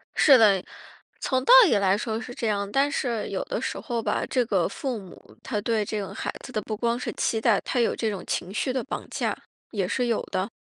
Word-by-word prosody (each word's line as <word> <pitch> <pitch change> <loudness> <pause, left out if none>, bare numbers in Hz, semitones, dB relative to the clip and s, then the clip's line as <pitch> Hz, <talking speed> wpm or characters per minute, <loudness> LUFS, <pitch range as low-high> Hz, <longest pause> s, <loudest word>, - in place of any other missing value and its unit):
是 275 -3 +7
的， 200 -5 +4 0.6
从 260 -1 0
道 - - +7
理 290 - +3
来 195 -1 +3
说 220 +1 -3
是 245 - -8
这 235 - -3
样。 200 -1 -1
但 275 +3 +2
是 235 -6 -2
有 - - -2
的 - - -3
时 - - -3
候 240 -3 -3
吧， - - -1
这 250 -2 +1
个 190 -6 +1
父 250 +2 -4
母， 190 -2 -15
他 215 -5 -2
对 220 -1 0
这 215 +1 -3
个 195 - -6
孩 - - -4
子 - - -9
的 215 - -2
不 215 - -4
光 235 +2 0
是 - - -3
期 225 - 0
待， 225 -4 +4
他 255 - -2
有 235 - +2
这 225 - -1
种 195 -4 -5
情 185 - -3
绪 255 +5 -1
的 260 -2 -1
绑 270 - -6
架。 - - -1 0.4
也 195 -4 -1
是 250 +4 0
有 230 -2 0
的。 190 +4 -1
225 Hz, 260 characters per minute, -25 LUFS, 205-245 Hz, 0.6 s, 是